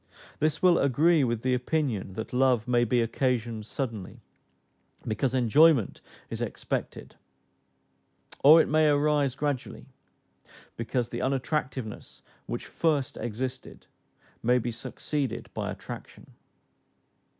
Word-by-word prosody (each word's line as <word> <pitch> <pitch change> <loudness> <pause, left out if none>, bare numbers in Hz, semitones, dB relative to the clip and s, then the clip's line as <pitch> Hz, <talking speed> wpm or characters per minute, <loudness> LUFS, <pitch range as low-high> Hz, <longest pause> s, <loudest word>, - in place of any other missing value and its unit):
This 155 +3 0
will 180 -2 +5
agree 150 +4 +3
with 120 -2 -1
the 130 0 +1
opinion 125 -7 -1
that 110 +4 -6
love 125 -3 +2
may 120 -1 +3
be 120 +1 +2
occasioned 115 -2 -1
suddenly, 115 -9 -5 0.9
because 120 +4 0
enjoyment 130 0 +4 0.3
is - - -4
expected; - - -4 1.3
or 155 +4 +9
it - - +3
may 155 0 +3
arise 145 -2 +2
gradually, 145 -3 -3 0.9
because 120 +1 -2
the 120 - -4
unattractiveness 130 -3 -3 0.2
which - - -4
first 150 -5 0
existed, 125 +3 -5 0.6
may 125 +2 +3
be 120 0 -2
succeeded 130 +1 -4
by - - -3
attraction. - - -9
130 Hz, 110 wpm, -27 LUFS, 115-145 Hz, 1.3 s, or